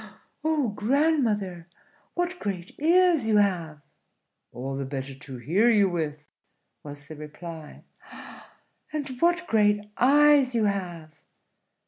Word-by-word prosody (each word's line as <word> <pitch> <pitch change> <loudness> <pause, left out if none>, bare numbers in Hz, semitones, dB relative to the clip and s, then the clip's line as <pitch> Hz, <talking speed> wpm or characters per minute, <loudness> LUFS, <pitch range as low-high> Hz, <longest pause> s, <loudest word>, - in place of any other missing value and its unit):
"Oh, 305 -6 +1
grandmother, 210 - 0 0.5
what 355 +1 -2
great 190 -3 -5
ears 340 -3 +3
you 215 -1 +3
have!" 170 -7 0 0.7
"All 135 +2 -5
the 135 - -3
better 135 0 -5
to 135 -1 -10
hear 180 - +2
you 210 -4 +4
with," 150 -3 -4 0.5
was 145 -1 -10
the 155 - -9
reply. 155 +1 -10 1.1
"And 300 -2 -3
what 345 +1 +2
great 210 -3 +1
eyes 280 -1 +5
you 225 -2 +2
have!" 175 -6 -3
205 Hz, 115 wpm, -26 LUFS, -, 1.1 s, eyes